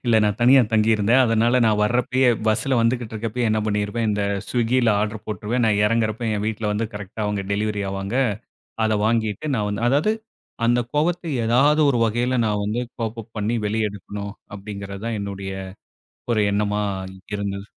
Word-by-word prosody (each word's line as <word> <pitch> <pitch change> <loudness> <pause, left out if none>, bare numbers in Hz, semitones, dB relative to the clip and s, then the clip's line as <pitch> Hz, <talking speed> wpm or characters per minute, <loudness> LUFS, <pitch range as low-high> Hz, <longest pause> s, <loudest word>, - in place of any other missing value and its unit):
இல்ல 120 -2 +3
நான் 105 +1 0
தனியா 130 +3 +7
தங்கியிருந்தேன். 110 +3 +4
அதனால 115 +2 +3
நான் 105 -1 +2
வரப்பயே 125 +3 +2 0.2
பஸ்ஸில 115 +4 +2
வந்துகிட்டு 115 -1 0
இருக்கிறப்பயே 115 +2 -1
என்ன 110 - +2
பண்ணியிருப்பேன், 105 +2 -1
இந்த 105 0 0 0.3
ஸ்விக்கியில, 120 0 +2
ஆர்டர் 110 0 -3
போட்டுருவேன். 110 +3 -1
நான் 105 -2 +2
எறங்கிறப்போ, 115 +1 0
என் 105 - -2
வீட்ல 110 0 -2
வந்து 110 +2 -1
கரெக்ட்டா 105 +1 -6
அவங்க 105 -2 -2
டெலிவரி 105 0 -1
ஆவாங்க. 100 +4 -3 0.7
அத 110 - +2
வாங்கிட்டு 110 +4 0
நான் 105 - 0
வந்து 105 +2 -3
அதாவது 145 - +2 0.5
அந்த 120 +1 +3
கோபத்த 175 +4 +1 0.2
ஏதாவது 140 +7 +4
ஒரு 120 - +1
வகைல 120 +3 0
நான் 105 -1 0
வந்து 110 +4 -1 0.2
கோப்-அப் 115 0 -5
பண்ணி 105 +3 -1
வெளிய 110 +1 0
எடுக்கணும், 100 +1 -7 0.2
அப்படிங்கிறது 100 0 -7
தான் 115 - -2
என்னுடைய, 100 -1 -5 0.8
ஒரு 110 - +2
எண்ணமா 105 0 0 0.5
இருந்தது. 100 -1 -4
110 Hz, 160 wpm, -22 LUFS, 105-120 Hz, 0.8 s, தனியா